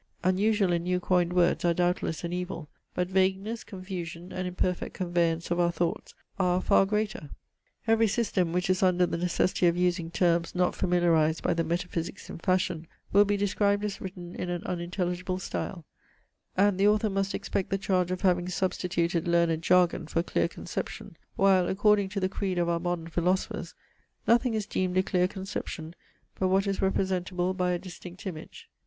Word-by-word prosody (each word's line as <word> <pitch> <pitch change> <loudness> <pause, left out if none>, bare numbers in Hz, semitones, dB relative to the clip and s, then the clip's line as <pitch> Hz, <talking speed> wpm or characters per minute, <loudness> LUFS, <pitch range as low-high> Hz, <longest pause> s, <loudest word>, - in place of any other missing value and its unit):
Unusual 195 +1 +2
and 170 0 0
new 180 0 0
coined 180 -1 +1
words 180 -1 +2
are 170 -1 +3
doubtless 175 -2 0
an 170 0 -3
evil; 180 -3 -4 0.3
but 180 0 0
vagueness, 190 +4 0
confusion, 185 -3 -7
and 185 0 -3
imperfect 180 0 -2
conveyance 170 -2 0
of 175 - +1
our 170 -1 +3
thoughts, 170 0 -2 0.2
are 180 -1 +3
a - - +2
far 195 - +4
greater. 210 -7 -2 0.6
Every 225 0 +4
system, 200 -5 0
which 180 +1 0
is 185 0 +1
under 180 -1 +4
the - - -3
necessity 180 +1 +1
of 170 0 +2
using 180 -2 +1
terms 170 -1 +1
not 180 0 +2
familiarized 170 -3 +2
by - - +2
the 165 0 0
metaphysics 170 +2 -3
in - - -8
fashion, 180 -2 0 0.3
will 205 +1 +7
be 205 0 +1
described 205 +1 +1
as 205 -1 -4
written 180 -2 -7
in 180 - -4
an 175 -1 -3
unintelligible 180 +1 -2
style, 180 -2 -5 0.7
and 200 -1 +3
the 200 - +5
author 210 0 +3
must 195 0 -1
expect 190 - -2
the 195 - +1
charge 185 -2 +1
of 185 0 -3
having 180 -2 +2
substituted 175 -2 -1
learned 170 -2 +2
jargon 175 -1 +3
for 165 +1 0
clear - - +1
conception; - - -6 0.2
while, 190 -2 +4
according 205 0 +3
to 200 +1 -3
the 185 - +1
creed 190 -1 -3
of 175 -1 +1
our 170 0 +1
modern 175 -1 -2
philosophers, 175 +3 -1 0.5
nothing 235 0 +3
is 215 -2 -1
deemed 185 -3 -1
a 185 - +4
clear 180 -1 +2
conception, 185 -4 -6 0.5
but 190 - +2
what 190 +2 +2
is 195 -1 -1
representable 185 -1 0
by 180 -1 0
a 180 - +1
distinct 180 +2 -10
image. 190 - -8
180 Hz, 180 wpm, -28 LUFS, 175-195 Hz, 0.7 s, will